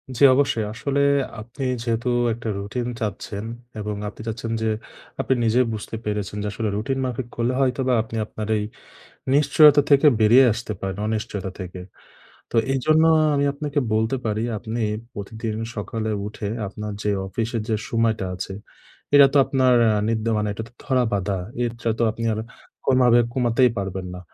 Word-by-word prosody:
জ্বি, 140 Hz, -, +6 dB
অবশ্যই। 135 Hz, -6 st, +1 dB
আসলে, 140 Hz, +4 st, -1 dB, 0.4 s
আপনি 120 Hz, +5 st, -8 dB, 0.2 s
যেহেতু 120 Hz, +1 st, -1 dB, 0.2 s
একটা 115 Hz, 0 st, -5 dB
রুটিন 105 Hz, +5 st, -3 dB
চাচ্ছেন 105 Hz, 0 st, -4 dB, 0.3 s
এবং 105 Hz, 0 st, -3 dB
আপনি 105 Hz, -, -8 dB
চাচ্ছেন 115 Hz, 0 st, -4 dB
যে, 110 Hz, -, +1 dB, 0.5 s
আপনি -, -, +2 dB
নিজেই 120 Hz, +3 st, +3 dB
বুঝতে 110 Hz, +1 st, -6 dB
পেরেছেন 105 Hz, -1 st, -3 dB
যে -, -, -2 dB
আসলে 110 Hz, +1 st, -2 dB
রুটিন 110 Hz, +6 st, -1 dB
মাফিক 125 Hz, -1 st, -3 dB
করলে 120 Hz, +2 st, 0 dB
হয়তোবা 130 Hz, -1 st, +1 dB
আপনি 115 Hz, -, -9 dB
আপনার 110 Hz, -1 st, -6 dB
এই 105 Hz, -, -1 dB, 0.7 s
নিশ্চয়তা 145 Hz, 0 st, +6 dB
থেকে 140 Hz, +1 st, +6 dB
বেরিয়ে 120 Hz, +5 st, +7 dB
আসতে 110 Hz, -1 st, -5 dB
পারেন, 95 Hz, 0 st, -4 dB
অনিশ্চয়তা 105 Hz, -3 st, -3 dB
থেকে। 90 Hz, -1 st, -7 dB, 0.7 s
তো, -, -, -4 dB, 0.2 s
এইজন্য 155 Hz, +4 st, +3 dB, 0.2 s
আ 155 Hz, -, +4 dB
আমি 140 Hz, -, +2 dB
আপনাকে 145 Hz, 0 st, -2 dB
বলতে 110 Hz, +4 st, +1 dB
পারি, 110 Hz, 0 st, -1 dB
আপনি 115 Hz, +2 st, -4 dB, 0.3 s
প্রতিদিন 110 Hz, +2 st, -5 dB, 0.2 s
সকালে 110 Hz, +1 st, -3 dB, 0.2 s
উঠে, 105 Hz, 0 st, -5 dB, 0.2 s
আপনার 105 Hz, +2 st, -6 dB
যে 105 Hz, -, +1 dB, 0.2 s
অফিসের 115 Hz, +2 st, -2 dB
যে 110 Hz, -, +2 dB
সময়টা 115 Hz, -3 st, +1 dB
আছে, 95 Hz, +1 st, -5 dB, 0.6 s
এটা 145 Hz, -1 st, +9 dB
তো 145 Hz, -, +5 dB
আপনার 130 Hz, -2 st, +3 dB
এ -, -, +4 dB, 0.2 s
নিত্য 110 Hz, -1 st, -1 dB
মানে, 105 Hz, -, 0 dB
এটা 110 Hz, -, -5 dB
তো 120 Hz, -, -30 dB
ধরা-বাঁধা। 105 Hz, -7 st, 0 dB, 0.3 s
এরটা 115 Hz, 0 st, -4 dB
তো -, -, +3 dB
আপনি 115 Hz, +1 st, -5 dB
আর 110 Hz, -, -3 dB, 0.5 s
কোনোভাবে 125 Hz, -2 st, +5 dB
কমাতেই 125 Hz, 0 st, +3 dB
পারবেন 95 Hz, -1 st, -3 dB
না। -, -, -7 dB
115 Hz, 165 wpm, -23 LUFS, 105-125 Hz, 0.7 s, এটা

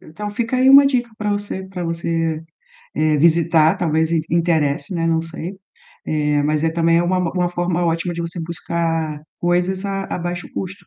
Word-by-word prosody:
Então 205 Hz, +7 st, -7 dB
fica 235 Hz, +4 st, -2 dB
aí 260 Hz, +1 st, +4 dB
uma 275 Hz, +1 st, +9 dB
dica 250 Hz, -3 st, 0 dB
para 210 Hz, -1 st, -2 dB
você, 205 Hz, -2 st, -3 dB
para 180 Hz, -2 st, -5 dB
você, 165 Hz, -1 st, -2 dB, 0.5 s
eh, 155 Hz, 0 st, +2 dB
visitar, 165 Hz, +2 st, +4 dB
talvez 160 Hz, -1 st, +1 dB, 0.2 s
interesse, 165 Hz, +1 st, +1 dB
né, 165 Hz, -1 st, -1 dB
não 165 Hz, 0 st, +2 dB
sei, 165 Hz, +3 st, -6 dB, 0.5 s
eh, 150 Hz, -1 st, +1 dB
mas 150 Hz, +1 st, 0 dB
é 165 Hz, -, +2 dB
também, 165 Hz, 0 st, +2 dB
é 170 Hz, -, +2 dB
uma-uma 180 Hz, 0 st, 0 dB
forma 175 Hz, 0 st, -1 dB
ótima 170 Hz, +1 st, -1 dB
de 170 Hz, -, -4 dB
você 170 Hz, +1 st, -5 dB
buscar 165 Hz, -2 st, -2 dB, 0.2 s
coisas 180 Hz, +2 st, 0 dB
a 195 Hz, 0 st, -2 dB
a -, -, -4 dB
baixo 175 Hz, 0 st, -4 dB
custo. 190 Hz, 0 st, -6 dB
170 Hz, 175 wpm, -20 LUFS, 165-185 Hz, 0.5 s, uma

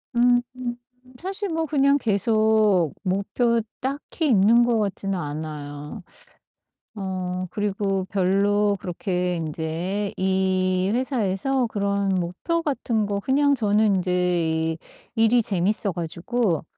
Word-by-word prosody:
음 245 Hz, 0 st, +4 dB, 0.8 s
사실 390 Hz, +2 st, -4 dB
뭐 325 Hz, 0 st, -1 dB
그냥 280 Hz, -1 st, +3 dB
계속 215 Hz, -, +2 dB
목표 210 Hz, +5 st, +1 dB, 0.2 s
딱히 285 Hz, +4 st, -2 dB
있는 230 Hz, +1 st, +5 dB
것 235 Hz, -2 st, +2 dB
같지는 195 Hz, -1 st, -2 dB
않아요. 150 Hz, -1 st, -6 dB, 0.9 s
어 185 Hz, -2 st, -3 dB
그리고 195 Hz, -2 st, -1 dB
별로 200 Hz, +2 st, +2 dB
그렇게 180 Hz, 0 st, -2 dB
인제 165 Hz, +5 st, -3 dB
이 190 Hz, 0 st, +1 dB
회사에서 250 Hz, 0 st, 0 dB
그런 200 Hz, -2 st, -1 dB
목표 185 Hz, -, -1 dB
같은 235 Hz, -7 st, -1 dB
거 200 Hz, -1 st, -1 dB
그냥 280 Hz, +5 st, +2 dB
저는 210 Hz, -3 st, +2 dB
인제 180 Hz, 0 st, -1 dB, 0.3 s
이 160 Hz, 0 st, -1 dB, 0.4 s
일이 225 Hz, +2 st, +4 dB
재밌어 200 Hz, -1 st, 0 dB
가지고 175 Hz, -, -1 dB
200 Hz, 210 characters per minute, -24 LUFS, 185-235 Hz, 0.9 s, 있는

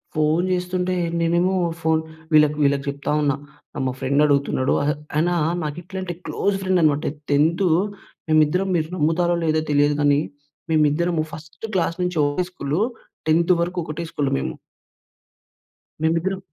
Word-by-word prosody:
Phone 155 Hz, +3 st, +2 dB
జేస్తుంటే 180 Hz, 0 st, -1 dB, 0.3 s
నేనేమో 170 Hz, +3 st, +2 dB, 0.3 s
phone 160 Hz, 0 st, +2 dB, 0.3 s
వీళ్ళక్ 150 Hz, -1 st, +5 dB
వీళ్ళకు 140 Hz, -1 st, +2 dB
చెప్తా 140 Hz, +1 st, -3 dB
ఉన్నా. 140 Hz, -2 st, +2 dB, 0.4 s
ఆహ్, -, -, -2 dB
మా -, -, 0 dB
ఫ్రెండడుగుతున్నాడు. 140 Hz, -1 st, +2 dB
అహె 150 Hz, +1 st, +2 dB, 0.2 s
ఆయనా 175 Hz, +3 st, +2 dB, 0.3 s
నాకిట్లంటే 175 Hz, +4 st, -5 dB
క్లోజ్ 200 Hz, 0 st, 0 dB
ఫ్రెండనమాట.టెన్తు 155 Hz, -1 st, +1 dB, 0.6 s
మేమిద్దరం 155 Hz, +5 st, +3 dB
మీరు 160 Hz, -2 st, 0 dB
నమ్ముతారో 175 Hz, +2 st, +2 dB
లేదో 155 Hz, -1 st, +2 dB
తెలియదు 145 Hz, 0 st, +3 dB
గానీ, 145 Hz, 0 st, +4 dB, 0.5 s
మేమిద్దరము 155 Hz, +2 st, +2 dB
ఫస్ట్ 155 Hz, +6 st, -9 dB
క్లాస్ 170 Hz, -2 st, 0 dB
నుంచి 180 Hz, -2 st, -1 dB
ఒకే 145 Hz, +5 st, 0 dB
స్కూలు. 150 Hz, +1 st, -2 dB, 0.5 s
టెన్తు 170 Hz, +3 st, +4 dB
వరుకు 175 Hz, +1 st, -2 dB
ఒకటే 155 Hz, +1 st, -5 dB
స్కూలు 140 Hz, -2 st, -1 dB
మేము. -, -, -3 dB, 1.5 s
మేమిద్దరం 170 Hz, +4 st, +1 dB
160 Hz, 125 wpm, -22 LUFS, 145-175 Hz, 1.5 s, వీళ్ళక్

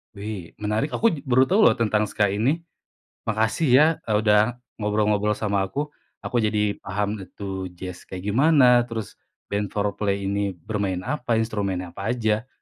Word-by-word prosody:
Wih, 100 Hz, -4 st, -6 dB
menarik, 110 Hz, +8 st, -1 dB
aku 230 Hz, -, +3 dB
j -, -, -8 dB
baru 130 Hz, 0 st, +3 dB
tahu 200 Hz, +4 st, +3 dB
loh -, -, +6 dB
tentang 105 Hz, -1 st, +2 dB
ska 105 Hz, 0 st, +1 dB
ini, 130 Hz, +10 st, +1 dB, 0.7 s
makasih 110 Hz, +8 st, +1 dB
ya 150 Hz, -, +7 dB, 0.2 s
e -, -, -5 dB
udah 110 Hz, +2 st, +3 dB, 0.2 s
ngobrol-ngobrol 105 Hz, 0 st, +1 dB
sama 100 Hz, -2 st, 0 dB
aku. 145 Hz, +10 st, -3 dB, 0.3 s
Aku -, -, -4 dB
jadi 105 Hz, -1 st, +1 dB
paham 100 Hz, +1 st, -2 dB, 0.2 s
tuh 95 Hz, -2 st, -4 dB
jazz 90 Hz, 0 st, -7 dB
kayak 90 Hz, 0 st, -7 dB
gimana, 140 Hz, +2 st, +5 dB, 0.2 s
terus 110 Hz, -4 st, -4 dB, 0.4 s
band 100 Hz, 0 st, -1 dB
Fourplay 100 Hz, -1 st, -1 dB
ini 100 Hz, +1 st, -1 dB, 0.2 s
bermain 100 Hz, +1 st, -2 dB
apa, 125 Hz, -4 st, -1 dB
instrumennya 100 Hz, -6 st, -2 dB
apa 100 Hz, +3 st, -4 dB
aja, 110 Hz, -1 st, 0 dB
105 Hz, 155 wpm, -24 LUFS, 100-115 Hz, 0.7 s, ya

